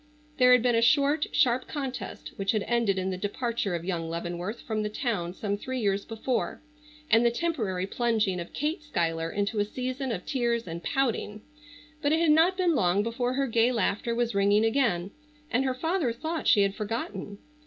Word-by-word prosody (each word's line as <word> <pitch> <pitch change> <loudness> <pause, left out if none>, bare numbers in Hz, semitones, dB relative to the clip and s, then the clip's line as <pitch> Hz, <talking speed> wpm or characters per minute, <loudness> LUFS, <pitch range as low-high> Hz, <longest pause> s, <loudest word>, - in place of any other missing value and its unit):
There 250 -1 +6
had 250 -2 +6
been 245 -1 +3
a 230 - +3
short, 285 +4 +3
sharp 250 0 +2
contest 270 -4 -5
which 195 -1 0
had 215 -2 0
ended 230 -4 +1
in 190 0 -1
the 185 - -3
departure 210 -1 -2
of 170 0 -5
young 170 -3 -2
Leavenworth 175 +5 -4
from 220 -1 -2
the 210 - -2
town 210 -7 -2
some 205 0 -2
three 260 +4 -4
years 200 -3 0
before, 230 +3 -2 0.5
and 225 +1 +6
the 235 - +5
temporary 235 - -1
plunging 215 -3 0
of 170 - -7
Kate 310 +5 -2
Schuyler 165 - -1
into 205 +3 -1
a - - +4
season 255 +4 -4
of 180 -5 -4
tears 235 -3 0
and 170 0 -6
pouting. 220 -5 -1 0.6
But 290 0 +2
it 320 - +3
had 335 -2 +4
not 335 +5 +4
been 360 -3 +2
long 190 - +2
before 245 +2 -1
her 275 +1 +1
gay 230 0 +3
laughter 225 0 0
was 235 -1 0
ringing 200 +2 +3
again, 225 -7 +1 0.4
and 255 +3 +2
her 260 -1 0
father 320 -1 0
thought 315 +8 -4
she 205 - +6
had 195 0 +1
forgotten. 205 -2 -4
230 Hz, 195 wpm, -28 LUFS, 200-260 Hz, 0.6 s, There